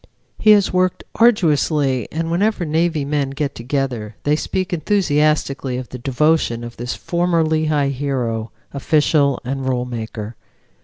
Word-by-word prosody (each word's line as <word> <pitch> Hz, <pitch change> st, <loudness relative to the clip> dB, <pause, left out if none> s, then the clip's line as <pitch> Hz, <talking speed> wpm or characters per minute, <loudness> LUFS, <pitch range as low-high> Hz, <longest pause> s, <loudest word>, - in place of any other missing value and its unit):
He 215 Hz, -, +3 dB
has 205 Hz, -3 st, +3 dB
worked 185 Hz, 0 st, +1 dB
arduously, 150 Hz, -, +2 dB
and 165 Hz, +1 st, -2 dB
whenever 200 Hz, +1 st, +1 dB
Navy 160 Hz, -1 st, 0 dB
men 145 Hz, -1 st, -1 dB
get 140 Hz, +1 st, -3 dB
together 120 Hz, -4 st, -3 dB
they 145 Hz, +1 st, +2 dB
speak 185 Hz, +4 st, -2 dB
enthusiastically 150 Hz, -7 st, +1 dB
of 125 Hz, -1 st, -6 dB
the 125 Hz, -, -8 dB
devotion 135 Hz, -2 st, +1 dB
of 120 Hz, 0 st, -8 dB
this 120 Hz, +1 st, -4 dB
former 170 Hz, -1 st, 0 dB
Lehigh 155 Hz, -2 st, +1 dB
hero, 125 Hz, -5 st, -2 dB, 0.2 s
official 145 Hz, -1 st, +2 dB
and 135 Hz, +1 st, -2 dB
rule 125 Hz, -1 st, 0 dB
maker. 110 Hz, -2 st, -6 dB
145 Hz, 140 wpm, -19 LUFS, 125-165 Hz, 0.2 s, He